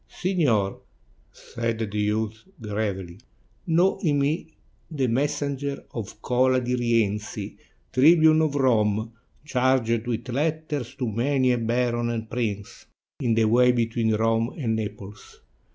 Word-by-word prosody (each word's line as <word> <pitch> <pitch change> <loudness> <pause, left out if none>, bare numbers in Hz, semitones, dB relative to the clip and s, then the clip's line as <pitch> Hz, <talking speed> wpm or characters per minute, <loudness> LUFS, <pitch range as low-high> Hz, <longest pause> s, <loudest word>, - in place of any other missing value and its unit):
"Signor," 140 - 0 0.5
said 115 -1 -4
the 110 -2 -4
youth 105 +1 -1
gravely, 100 -5 -4 0.5
"know 175 +3 +3
in 150 -7 +2
me 150 +3 -1 0.3
the 145 -5 -1
messenger 140 +2 -1
of 110 -1 -7
Cola 130 +1 +3
di 125 0 -2
Rienzi, 115 -4 -1 0.4
Tribune 155 +3 +6
of 155 -2 0
Rome, 110 -4 +1 0.3
charged 125 -4 +1
with 120 0 -3
letters 150 -1 -2
to 125 - -3
many 130 +4 +1
a 120 - +1
baron 120 +1 0
and 115 -1 -3
prince 105 -4 -4 0.3
in 120 -4 +1
the 115 0 +3
ways 125 +3 +4
between 115 -1 +1
Rome 115 +2 0
and 115 -7 -1
Naples. 105 -2 -7
120 Hz, 125 wpm, -25 LUFS, 110-140 Hz, 0.5 s, Tribune